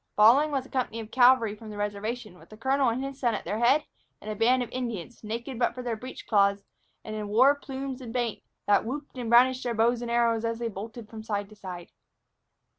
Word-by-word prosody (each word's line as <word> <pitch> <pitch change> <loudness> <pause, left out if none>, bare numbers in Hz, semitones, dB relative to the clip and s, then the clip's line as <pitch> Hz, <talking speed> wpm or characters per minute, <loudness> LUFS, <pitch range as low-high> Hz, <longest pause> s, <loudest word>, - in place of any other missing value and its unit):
Following 245 +9 +6
was 275 -3 -1
a - - -15
company 250 -3 -2
of 220 0 -8
cavalry 245 -4 +5
from 215 +1 -11
the 210 - -8
reservation, 205 -1 -4
with - - -18
the 215 - -12
colonel 265 +2 +2
and 240 +3 -2
his 275 0 -6
son 240 -4 +1
at - - -6
their 205 +5 -2
head, 265 +6 +4 0.4
and 215 - -6
a - - -4
band 245 +4 +3
of 240 - -9
Indians, 240 -3 -5
naked 235 +3 -5
but 240 -1 +1
for 250 - -6
their 240 -2 -2
breech 255 +4 -9
cloths, 200 -2 +3 0.4
and 215 - -6
in 210 -1 -4
war 250 +7 +5
plumes 270 -2 -6
and 240 -3 -7
paint, 240 -2 -2 0.2
that 205 -1 +4
whooped 280 +5 -6
and 235 -2 -3
brandished 255 +2 +5
their 240 -2 -2
bows 235 +2 +2
and 240 - -4
arrows 235 -1 +2
as 230 0 -1
they 235 0 -2
bolted 220 +2 -8
from 220 0 -9
side 205 -2 -3
to 215 - -14
side. 180 -4 -8
235 Hz, 235 wpm, -27 LUFS, 215-255 Hz, 0.4 s, Following